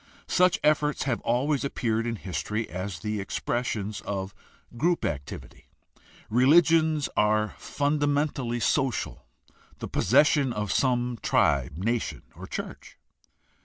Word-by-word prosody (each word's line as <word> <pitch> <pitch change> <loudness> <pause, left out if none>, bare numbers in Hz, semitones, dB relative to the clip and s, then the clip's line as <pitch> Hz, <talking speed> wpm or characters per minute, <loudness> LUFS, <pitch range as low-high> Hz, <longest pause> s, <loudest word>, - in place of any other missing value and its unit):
Such 180 0 +3
efforts 150 -1 +2
have 125 -4 -1
always 135 +4 0
appeared 115 -4 -1
in 115 - -2
history 100 +4 -3
as 90 -1 -5
the 105 +1 -2
expressions 105 0 -3
of 95 -1 -4 0.4
group 170 +7 +1
activity. 70 -2 -6 0.6
Religions 155 +4 +4
are 105 0 +2
fundamentally 145 -4 0
social, 135 -2 -1 0.5
the - - -6
pos - - -2
session 135 - +4
of 105 -1 -2
some 125 -2 +1
tribe, 70 0 +1
nation, 115 +5 -2
or - - -9
church. - - -7
120 Hz, 115 wpm, -27 LUFS, 105-145 Hz, 0.6 s, Religions